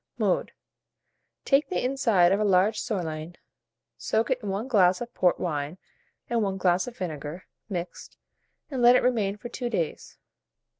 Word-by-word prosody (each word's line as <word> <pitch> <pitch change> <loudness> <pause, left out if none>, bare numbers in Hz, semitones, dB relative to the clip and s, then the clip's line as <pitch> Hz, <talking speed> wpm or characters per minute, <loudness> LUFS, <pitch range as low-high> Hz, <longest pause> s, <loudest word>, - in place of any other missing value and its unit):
Mode. - - 0 0.9
Take 275 +2 +3
the - - -1
inside 225 -9 +3
of 195 - +2
a - - +1
large 200 +2 +3
sirloin, 170 -6 -4 0.6
soak 220 - 0
it 250 -1 0
in 205 - -5
1 200 +5 -2
glass 185 -7 +4
of 240 0 -7
port 180 -1 +2
wine 150 -1 -3 0.5
and 235 -1 0
1 195 -2 -1
glass 180 +1 +2
of 245 - -8
vinegar, 155 -1 -6 0.2
mixed, 175 -3 -6 0.5
and 260 -3 -2
let 240 +1 +7
it - - +3
remain 215 -5 +1
for 240 - -8
2 245 0 -4
days. 170 -9 -3
195 Hz, 160 wpm, -26 LUFS, 175-240 Hz, 0.9 s, let